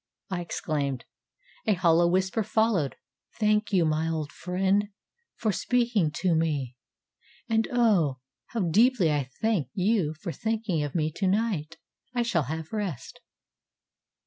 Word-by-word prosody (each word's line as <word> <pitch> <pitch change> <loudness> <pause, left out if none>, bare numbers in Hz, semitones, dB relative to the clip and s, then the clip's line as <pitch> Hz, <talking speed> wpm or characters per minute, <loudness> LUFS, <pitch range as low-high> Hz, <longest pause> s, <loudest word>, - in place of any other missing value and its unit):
ŌĆØ 185 - -1
I - - -3
exclaimed. 140 -6 -2 0.6
A 215 - +5
hollow 170 -1 +4
whisper 190 +5 +1
followed: 215 -8 +1 0.4
ŌĆ£Thank 210 0 +2
you, 180 -4 +3
my 155 +1 +1
old 155 -2 -3
friend, 190 +3 0 0.5
for 220 - 0
speaking 235 -5 +1
to 185 -3 +3
me, 150 -6 0 0.7
and, 225 -1 +1
oh, 205 - +3 0.3
how 230 - -3
deeply 200 0 +4
I 145 -3 -1
thank 215 -10 +2
you 190 -5 +1
for 170 +3 -5
thinking 220 -5 -1
of 145 -2 -4
me 155 -2 +1
to 190 +5 -1
night 185 -6 0 0.4
I 240 - +2
shall 175 - +1
have 160 +4 -5
rest. 195 - -4
180 Hz, 140 wpm, -27 LUFS, 155-215 Hz, 0.7 s, A